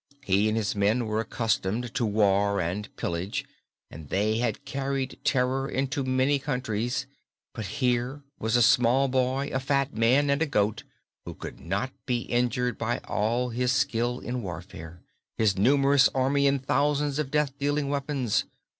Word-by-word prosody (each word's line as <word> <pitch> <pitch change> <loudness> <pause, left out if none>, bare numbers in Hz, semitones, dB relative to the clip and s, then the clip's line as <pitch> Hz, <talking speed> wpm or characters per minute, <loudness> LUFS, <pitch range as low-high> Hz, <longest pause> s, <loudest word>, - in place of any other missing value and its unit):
He 100 -1 +2
and 110 +1 0
his 105 -2 -1
men 105 +4 +2
were 110 0 -1
accustomed 115 +1 -1
to 120 - 0
war 100 -1 +2
and 90 +5 -2
pillage 85 +4 -3 0.5
and 75 -2 -10
they 105 +3 +1
had 120 +3 -2
carried 135 0 -3
terror 130 +1 +1
into 135 +1 -1
many 130 +2 +2
countries, 125 -1 -2 0.5
but 110 -4 -5
here 125 +5 -1 0.2
was 110 +2 0
a 120 - +5
small 125 +3 +4
boy, 130 +2 0
a 130 - +1
fat 140 +1 0
man 130 +6 +3
and 140 +2 +1
a 160 - +2
goat 105 -4 0 0.4
who - - -8
could - - -8
not 100 +9 -2 0.2
be 120 -2 0
injured 125 0 0
by 115 +1 0
all 120 +4 0
his 125 +1 0
skill 125 -2 0
in 125 0 -4
warfare, 85 -3 -8 0.3
his 110 -3 +2
numerous 135 +6 +4
army 140 +2 +2
and 135 -1 0
thousands 145 +1 +1
of 150 -3 -1
death 150 -1 +1
dealing 145 0 0
weapons. 140 -4 0
125 Hz, 160 wpm, -27 LUFS, 110-135 Hz, 0.5 s, a